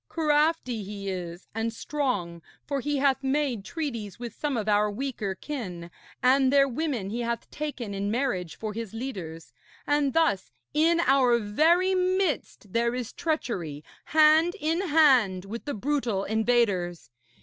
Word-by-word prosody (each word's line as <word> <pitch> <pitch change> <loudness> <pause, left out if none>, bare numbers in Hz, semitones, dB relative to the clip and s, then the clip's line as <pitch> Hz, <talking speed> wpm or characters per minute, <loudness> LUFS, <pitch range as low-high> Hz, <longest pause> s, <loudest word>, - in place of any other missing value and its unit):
Crafty 300 -6 +1
he 200 0 -6
is 175 -1 -6
and 225 +1 -1
strong, 225 - -2 0.2
for 280 -1 -2
he 290 +2 -1
hath 270 -1 +2
made 265 -5 0
treaties 235 - -5
with 240 -2 -7
some 290 -1 -2
of 215 -1 -3
our 210 0 +3
weaker 210 -4 -3
kin, 180 - -6 0.3
and 260 +1 +4
their 275 0 +5
women 255 -7 -2
he 235 - -3
hath 235 -1 -2
taken 275 -8 -4
in 200 +1 -2
marriage 205 - -1
for 215 -1 -4
his 225 -1 -6
leaders, 185 -10 -6 0.3
and 290 -2 +1
thus 320 - +2 0.2
in 330 +3 +3
our 260 -5 +4
very 320 - +3
midst 365 - -1
there 235 +1 +1
is 250 -2 -4
treachery, 180 - -3 0.2
hand 315 +3 +5
in 325 +2 0
hand 255 - +4
with 225 +4 -7
the 285 - -3
brutal 235 -4 -1
invaders. 205 - 0
245 Hz, 150 wpm, -27 LUFS, 205-295 Hz, 0.3 s, their